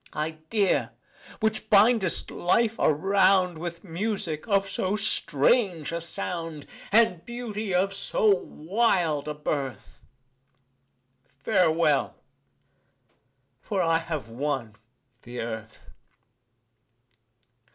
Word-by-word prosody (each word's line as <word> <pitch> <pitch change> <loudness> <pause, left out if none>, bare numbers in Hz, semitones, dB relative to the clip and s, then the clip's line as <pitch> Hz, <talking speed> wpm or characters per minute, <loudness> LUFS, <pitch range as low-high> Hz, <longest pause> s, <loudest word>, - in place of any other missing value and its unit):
Idea! 160 +6 -1 0.5
which 220 0 -1
bindest 210 -2 +4
life 225 +5 +1
around 185 +2 +3
With 170 0 -6
music 180 -3 -3
of 195 -2 +2
so 195 0 -1
strange 190 - +1
a 170 0 -3
sound, 165 -2 -5 0.3
And 210 -6 +4
beauty 220 -4 -5
of 190 +2 +1
so 195 - -2
wild 175 -4 0
a 150 - -3
birth 140 -3 -4 1.4
Farewell! 155 - +2 1.5
for 195 -3 -1
I 165 -1 +2
have 160 -6 -5
won 120 -2 -3 0.5
the 120 0 -8
Earth. 110 -1 -7
170 Hz, 90 wpm, -26 LUFS, 150-200 Hz, 1.5 s, bindest